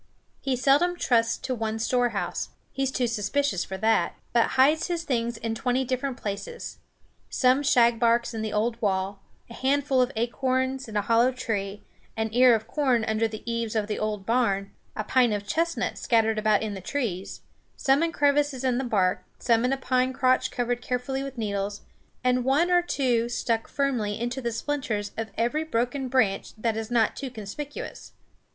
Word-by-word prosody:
He 270 -2 0
seldom 285 +8 +3
trusts 230 -5 +2
to 260 - -3
one 220 -2 -2
storehouse 225 -5 -1 0.2
he 270 - -4
is 270 -1 +1
too 255 - 0
suspicious 230 -1 0
for 190 - -6
that 205 -4 +2 0.2
but 235 -1 +4
hides 300 +5 +4
his 345 -2 -2
things 235 -5 -1
in 225 0 -3
twenty 250 +2 0
different 255 +1 -2
places; 215 - -6 0.5
some 255 +1 +3
shagbarks 235 -2 +3
in 220 - -3
the 215 -1 -3
old 230 +3 -1
wall, 195 -1 -1 0.3
a 235 - -11
handful 270 +1 +1
of 250 +1 +1
acorns 260 +3 -1
in 215 -1 -4
a 205 - +1
hollow 230 +4 +4
tree, 205 -5 -3 0.3
an 220 0 0
ear 250 0 +6
of 220 - -3
corn 255 -7 +1
under 220 +1 +1
the 215 -1 -8
eaves 230 -1 -2
of 215 -2 +1
the 210 0 -3
old 210 -2 -2
barn, 200 -4 +1 0.2
a 215 - -2
pint 245 +1 +3
of 205 -1 -3
chestnuts 330 +10 -1
scattered 225 -2 +2
about 215 0 +2
in 215 -2 -3
the 190 - -7
trees, 195 -5 -3 0.3
some 270 +2 +2
in 335 0 +1
crevices 285 -3 +1
in 255 -1 +1
the - - -1
bark, 195 -7 +1
some 230 -1 +2
in 250 - +2
a 270 - +1
pine 255 -1 +1
crotch 255 0 +2
covered 245 0 -2
carefully 250 +2 -2
with 275 -1 -6
needles, 205 -2 -2 0.4
and 250 0 +2
one 290 +8 +2
or 355 0 +5
two 245 -8 0
stuck 230 -1 -1
firmly 250 -8 -1
into 240 +3 -3
the 235 -1 -2
splinters 230 -4 -2
of 225 0 -4
every 240 +7 +1
broken 255 -1 -1
branch 245 -7 +1
that 225 0 0
is 220 0 -4
not 230 -3 +2
too 270 - -5
conspicuous. 255 +6 -7
240 Hz, 185 wpm, -26 LUFS, 220-265 Hz, 0.5 s, ear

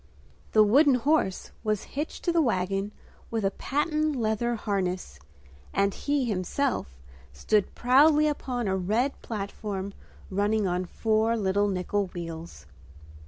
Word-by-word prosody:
The 215 - +7
wooden 270 +6 +5
horse 250 -6 +1
was 215 -2 0
hitched 295 +3 -4
to 345 - +2
the 335 -1 +3
wagon 195 -4 0 0.4
with 225 -3 -1
a 195 - +2
patent 305 +5 0
leather 235 0 0
harness; 185 - -2 0.6
and 200 0 +2
he, 285 -2 0
himself, 195 - -1 0.4
stood 210 - 0
proudly 295 +5 +5
upon 250 -6 -2
a 190 - +1
red 215 +9 0
platform 200 -2 -5 0.4
running 205 +2 +1
on 180 0 0
four 220 +4 +1
little 205 0 +1
nickel 195 +1 -1
wheels. 165 -1 -7
215 Hz, 125 wpm, -27 LUFS, 190-255 Hz, 0.6 s, The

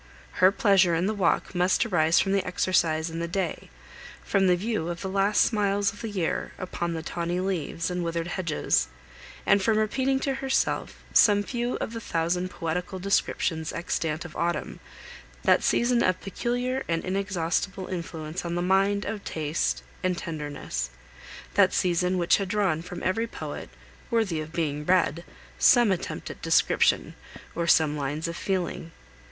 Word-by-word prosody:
Her 185 +1 +7
pleasure 195 -4 +4
in 170 +3 +1
the 215 - 0
walk 190 -3 +1
must 180 +5 +2
arise 170 -6 +3
from 195 - +1
the 195 -1 +2
exercise 165 -3 +1
and 165 +1 -4
the 170 - -2
day, 175 -1 -3 0.5
from 195 -1 +2
the 180 - +5
view 200 -3 -2
of 175 0 -4
the 190 - -3
last 195 +2 +2
smiles 205 -2 +2
of 205 - -12
the 225 - -4
year 185 -5 -2
upon 175 -2 -3
the 160 - -4
tawny 175 +1 -2
leaves, 175 -2 -2
and 180 0 -2
withered 165 0 -2
hedges, 170 - 0 0.6
and 200 - +4
from 215 +3 +2
repeating 260 +5 +1
to 275 - 0
herself 265 0 -1
some 205 -1 +6
few 240 +2 -2
of 225 - -4
the 230 - -5
thousand 175 0 -1
poetical 180 +2 -3
descriptions 180 -4 0
extant 165 -2 -2
of 170 - -10
autumn, 170 0 -2 0.6
that - - +4
season 240 0 +2
of 185 -3 +2
peculiar 245 +6 -2
and 165 0 -1
inexhaustible 190 0 -1
influence 165 -2 -5
on 170 0 -3
the 175 - -1
mind 195 +2 +2
of 210 -2 -4
taste 155 0 -1 0.2
and 185 -1 0
tenderness, 145 - -4 0.6
that - - +4
season 180 +1 +1
which 175 0 +4
had 195 - -2
drawn 190 -6 +1
from 175 0 -8
every 225 +5 0
poet, - - -7 0.4
worthy 215 -9 +1
of 155 +1 -8
being 150 -3 -2
read, 170 -1 +2 0.4
some 240 -5 +6
attempt 185 - -3
at - - -12
description, - - +2 0.4
or 170 0 -2
some 155 -2 +4
lines 150 +3 -2
of 170 - -4
feeling. 180 -3 -2
180 Hz, 165 wpm, -26 LUFS, 165-200 Hz, 0.6 s, Her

